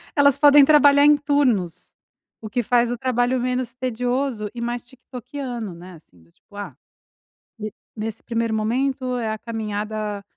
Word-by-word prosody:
elas 285 Hz, -2 st, +4 dB
podem 290 Hz, -1 st, +7 dB
trabalhar 285 Hz, -1 st, +6 dB
em 295 Hz, 0 st, +6 dB
turnos, 265 Hz, -, 0 dB, 0.5 s
o 215 Hz, -, -7 dB
que 240 Hz, +4 st, -1 dB
faz 240 Hz, +1 st, +2 dB
o 245 Hz, -, -3 dB
trabalho 250 Hz, 0 st, 0 dB
menos 250 Hz, -1 st, -2 dB
tedioso 250 Hz, -2 st, -2 dB
e 235 Hz, -, -7 dB
mais 240 Hz, 0 st, -3 dB
"tiktokiano", 250 Hz, -3 st, -7 dB
né, 180 Hz, +2 st, -12 dB
assim, 90 Hz, -, -21 dB
do 85 Hz, -, -27 dB
tipo, 205 Hz, -, -23 dB
ah, 205 Hz, 0 st, -7 dB, 0.8 s
ne 215 Hz, -1 st, -5 dB, 0.2 s
nesse 220 Hz, 0 st, -5 dB
primeiro 230 Hz, -1 st, -2 dB
momento 255 Hz, +3 st, -1 dB
é 230 Hz, -3 st, -2 dB
a 215 Hz, -, -3 dB
caminhada 215 Hz, -2 st, -4 dB
240 Hz, 155 wpm, -22 LUFS, 215-260 Hz, 0.8 s, podem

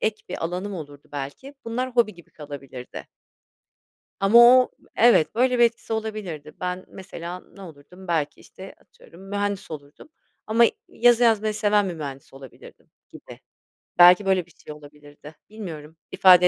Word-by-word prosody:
ek 215 Hz, 0 st, -2 dB
bir 180 Hz, -, -5 dB
alanım 185 Hz, +4 st, -4 dB
olurdu, 145 Hz, -4 st, -10 dB
belki 145 Hz, -, -7 dB
bunlar 250 Hz, +3 st, -3 dB
hobi 235 Hz, -4 st, +1 dB
gibi 170 Hz, -, -18 dB
kalabilirdi. 140 Hz, -4 st, -10 dB, 1.1 s
Ama 195 Hz, +4 st, +5 dB
o 250 Hz, +1 st, +7 dB, 0.3 s
Evet, 225 Hz, -10 st, +4 dB
böyle 250 Hz, +1 st, +2 dB
bir 240 Hz, -, +6 dB
etkisi 230 Hz, -1 st, -2 dB
olabilirdi. 210 Hz, -9 st, -5 dB
Ben 180 Hz, 0 st, -4 dB
mesela 180 Hz, -1 st, -8 dB
ne 200 Hz, -, -19 dB
olurdum, 175 Hz, +3 st, -14 dB
belki, 155 Hz, -3 st, -1 dB
işte, 190 Hz, +1 st, -13 dB
atıyorum, 175 Hz, +3 st, -19 dB
mühendis 205 Hz, -2 st, -3 dB
olurdum 145 Hz, -, -11 dB, 0.4 s
ama 230 Hz, +2 st, +4 dB, 0.2 s
yazı 240 Hz, 0 st, +3 dB
yazmayı 215 Hz, -2 st, +2 dB
seven 210 Hz, -2 st, +2 dB
bir 175 Hz, -, -5 dB
mühendis 140 Hz, -4 st, -8 dB
olabilirdim 135 Hz, -2 st, -15 dB, 0.2 s
gibi. -, -, -13 dB, 0.6 s
Belki 180 Hz, +3 st, +8 dB
böyle 190 Hz, -3 st, +1 dB
bir 175 Hz, -, -23 dB
şey 150 Hz, -, -12 dB
olabilirdi. 150 Hz, 0 st, -15 dB
Bilmiyorum, 165 Hz, -8 st, -9 dB
ifade 180 Hz, -1 st, +6 dB
185 Hz, 145 wpm, -23 LUFS, 150-215 Hz, 1.1 s, Belki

